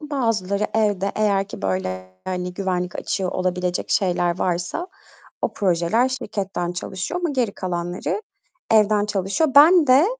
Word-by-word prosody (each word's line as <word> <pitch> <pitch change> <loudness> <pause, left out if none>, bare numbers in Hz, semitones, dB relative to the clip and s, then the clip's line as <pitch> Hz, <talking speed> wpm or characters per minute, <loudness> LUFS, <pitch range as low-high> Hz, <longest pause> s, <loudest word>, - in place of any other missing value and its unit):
bazıları 225 -9 -1
evde, 205 -3 +1
eğer 200 -2 +1
ki, - - -9
böyle, 95 -1 -2 0.2
hani, 180 -1 -3
güvenlik 180 -2 -2
açığı 190 -2 -2
olabilecek 180 -1 -2
şeyler 175 -2 +1
varsa 180 - -1 0.6
o - - 0
projeler 190 +6 +2
şirketten 195 -8 -3
çalışıyor 185 - -4
ama 345 - 0
geri 245 -7 0
kalanları 175 - -3 0.5
evden 210 -1 +4
çalışıyor. 200 - 0
Ben 325 +2 +8
de 260 +4 +6
195 Hz, 130 wpm, -22 LUFS, 180-220 Hz, 0.6 s, Ben